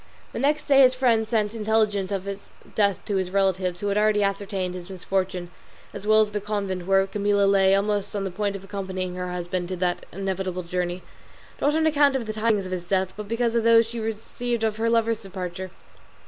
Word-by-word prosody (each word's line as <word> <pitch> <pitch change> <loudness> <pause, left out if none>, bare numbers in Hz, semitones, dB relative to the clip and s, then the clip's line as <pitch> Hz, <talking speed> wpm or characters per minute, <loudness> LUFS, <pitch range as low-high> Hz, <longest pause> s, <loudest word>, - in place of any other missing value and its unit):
The - - -4
next 295 +3 +1
day 275 -2 +4
his 255 -1 +6
friend 230 -4 +2
sent 215 -2 +1
intelligence 210 -3 +1
of 195 -2 -2
his 200 0 -7 0.2
death 200 -4 +1
to 200 - -1
his 185 -1 -1
relatives, 190 -2 0
who 205 - -1
had 200 +1 +1
already 210 -1 +3
ascertained 195 -2 -2
his 180 0 -8
misfortune, 185 -1 -2 0.4
as 205 - -7
well 215 0 +6
as 210 -1 0
the 210 0 -2
convent 200 -3 -3
where 195 0 +4
Camilla 200 0 +1
lay 195 -1 +4
almost 205 0 0
on 200 - -1
the 190 - -3
point 200 +2 -2
of 195 - -7
accompanying 190 -2 -4
her 180 0 -4
husband 180 0 -3
on 185 - -2
that 175 0 -1
inevitable 190 -1 -3
journey, 180 +1 -3 0.6
not 295 +2 +2
on 320 0 +2
account 290 -3 +4
of 255 -3 -1
the 215 - -4
tidings 215 -2 +1
of 185 - -7
his 180 -1 -3
death, 185 0 0
but 210 -1 -7
because 230 +1 0
of 235 -1 +1
those 230 0 +6
she 230 +1 -6
received 225 +2 -3
of 220 -1 0
her 230 +1 +1
lover's 230 -1 +1
departure. 185 -2 -6
200 Hz, 215 wpm, -25 LUFS, 185-220 Hz, 0.6 s, his